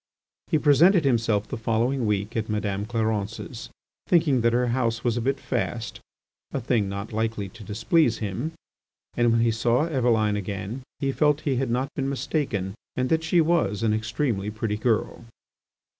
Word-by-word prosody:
He 160 - +2
presented 155 +4 +5
himself 115 -5 +1
the 130 - -4
following 115 +2 0
week 105 0 -1
at 110 -1 -2
Madame 105 -1 -2
Clarence's, 110 -2 -3 0.4
thinking 155 -8 +3
that 115 +1 +3
her 120 +1 +1
house 120 -2 0
was 120 -2 +1
a 120 - -1
bit 135 +3 0
fast—a 120 +2 -5
thing 115 -5 0
not 100 +2 -5
likely 110 -2 -2
to 115 +2 -12
displease 115 - +2
him—and 120 - -4
when 115 0 +3
he 115 0 +3
saw 120 +5 +2
Eveline 115 -8 +1
again 105 +5 -4 0.2
he 140 -2 -1
felt 150 +1 +2
he 135 -4 0
had 130 -1 0
not 130 +4 -1
been 135 -1 -2
mistaken 130 - -2 0.2
and 130 0 0
that 160 0 +2
she 165 +1 +3
was 155 - +1
an 110 -1 +2
extremely 110 -1 -1
pretty 110 0 -2
girl. 110 0 -1
115 Hz, 160 wpm, -25 LUFS, 105-135 Hz, 0.4 s, presented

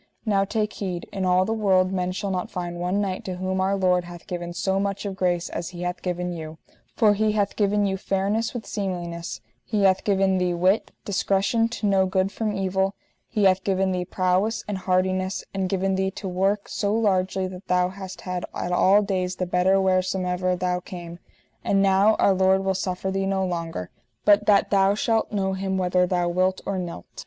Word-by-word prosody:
Now 200 -3 +2
take 215 +1 -1
heed, 180 -4 -4
in 190 -1 -2
all 185 0 +3
the 220 - -1
world 190 -4 +2
men 180 -1 -1
shall 195 +1 -3
not 180 -1 -2
find 175 -2 -4
one 180 +3 0
knight 190 -2 -2
to 185 - -3
whom 185 +1 -2
Our 195 +1 +1
Lord 180 -2 +2
hath 175 -1 -11
given 175 -2 -5
so 190 +2 0
much 200 +1 -2
of 195 -1 -3
grace 180 -2 0
as 170 - -5
He 175 -1 -7
hath 180 0 -3
given 180 -1 -2
you, 160 -1 -7 0.4
for 215 -3 +5
He 215 +1 +1
hath 205 -1 0
given 205 0 +2
you 190 -1 0
fairness 200 +4 -1
with 225 -4 -5
seemliness, 175 -4 -4 0.2
He 210 -2 -1
hath 190 -1 +4
given 195 -2 +2
thee 180 -1 0
wit, 185 +5 +2 0.2
discretion 200 +3 +1
to 230 -2 -4
know 195 -2 +3
good 190 +1 0
from 220 0 -2
evil, 195 0 0 0.3
He 210 -3 0
hath 190 -1 +4
given 190 -1 +1
thee 180 -1 -1
prowess 185 +5 0
and 205 -2 -3
hardiness, 185 +1 0
and 190 -1 -1
given 195 0 0
thee 190 0 +1
to 195 +1 -7
work 195 +3 0
so 200 -1 -1
largely 190 -3 +1
that 185 +1 -10
thou 180 0 +2
hast 190 0 -8
had 180 -1 -4
at 175 - -3
all 195 +3 +5
days 185 -2 -1
the 185 - -2
better 180 +2 +3
wheresomever 185 -1 +1
thou 180 0 -1
came; 175 -1 -9 0.4
and 200 - +2
now 195 +2 +4
Our 195 - +3
Lord 190 0 +3
will 190 - +2
suffer 190 0 -2
thee 195 0 -1
no 190 -1 0
longer, 165 - -4 0.3
but 205 0 +5
that 200 -2 +4
thou 195 0 +4
shalt 225 +1 0
know 190 -2 0
Him 190 0 -2
whether 180 0 +2
thou 175 -1 0
wilt 185 +2 +1
or 195 -1 -2
nylt. 170 - -6
190 Hz, 205 wpm, -24 LUFS, 180-195 Hz, 0.4 s, for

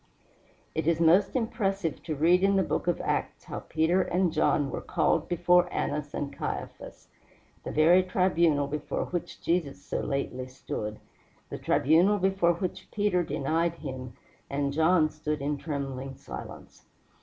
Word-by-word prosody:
It 160 -1 -2
is 165 -1 +2
most 170 +8 +4
impressive 200 - -1
to 155 - -2
read 170 +5 +4
in 200 0 +4
the 190 - +3
Book - - -2
of 175 - +1
Acts - - -2
how - - -6
Peter 160 +4 +1
and 180 -2 +1
John 150 -3 +2
were - - -4
called - - 0
before 175 +1 +3
Annas 145 0 -2
and 140 -1 -3
Caiaphas - - -6 0.5
the - - -5
very 165 +4 +5
tribunal 170 -5 +2
before 150 +1 -3
which 175 -1 -5
Jesus 165 -5 0
so - - -2
lately 130 -2 -3
stood, 105 -4 -5 0.5
the - - -5
tribunal 170 +8 +3
before 190 -2 +2
which 185 +1 -5
Peter 205 -4 +1
denied 165 +1 0
him 130 -5 -7 0.4
and 140 0 -1
John 160 +1 +4
stood 150 0 -3
in 145 +1 -2
trembling 135 -3 -4
silence. - - -10
160 Hz, 150 wpm, -28 LUFS, 145-180 Hz, 0.5 s, very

